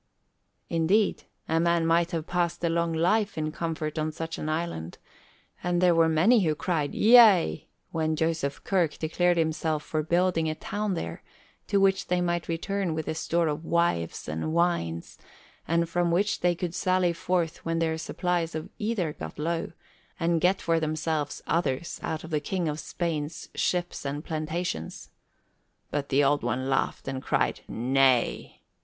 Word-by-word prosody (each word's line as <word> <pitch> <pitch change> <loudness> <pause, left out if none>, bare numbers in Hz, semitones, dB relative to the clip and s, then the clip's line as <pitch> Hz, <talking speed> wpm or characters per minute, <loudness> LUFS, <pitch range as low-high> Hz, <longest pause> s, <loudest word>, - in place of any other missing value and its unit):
Indeed, 170 +6 +1 0.2
a 160 0 +2
man 170 0 +2
might 165 +1 +3
have 165 -3 -3
passed 175 -1 -1
a 170 - +2
long 170 0 +1
life 190 +6 +1
in 155 0 -1
comfort 160 -1 -3
on 155 0 -1
such 165 +1 -5
an 155 - -3
island, 155 - -3 0.6
and 175 0 0
there 180 -1 +5
were 165 -1 +4
many 185 +10 +5
who 155 -3 +1
cried 155 -4 -1
yea, 220 -6 +6 0.2
when 160 -1 0
Joseph 160 -3 -1
Kirk 175 -6 +1
declared 175 +2 +1
himself 160 -1 0
for 155 0 -1
building 170 0 +1
a 155 - -2
town 205 +3 -2
there, - - -5 0.5
to 200 - +2
which 195 0 +2
they 180 0 +1
might 175 -1 -1
return 175 +1 -2
with 160 -1 -4
a - - -1
store 165 +1 0
of 150 +1 -2
wives 165 - 0
and 80 - -3
wines, 165 - -1 0.5
and 170 +1 +2
from 175 +1 0
which 195 +5 +1
they 175 -1 +2
could 170 -1 -4
sally 185 -1 +2
forth 170 -1 -1
when 165 0 -1
their 160 -1 0
supplies 170 0 -1
of 155 - -5
either 210 -8 -1
got 80 - -8
low, 165 +2 -2 0.5
and 165 -1 +1
get 185 +3 +3
for 165 -1 +2
themselves 155 -1 -2
others 165 -1 -1
out 160 -1 -3
of 165 - -9
the 155 - +1
King 175 +3 -2
of 150 0 -2
Spain's 155 -1 -4
ships 175 -1 -1
and 145 +2 -4
plantations. 155 - -4 0.8
But 145 -1 -2
the 140 +1 +3
Old 145 +1 +3
One 130 +1 -2
laughed 135 - -1
and 135 -1 -3
cried - - 0
nay. 130 0 +1
165 Hz, 165 wpm, -27 LUFS, 155-175 Hz, 0.8 s, yea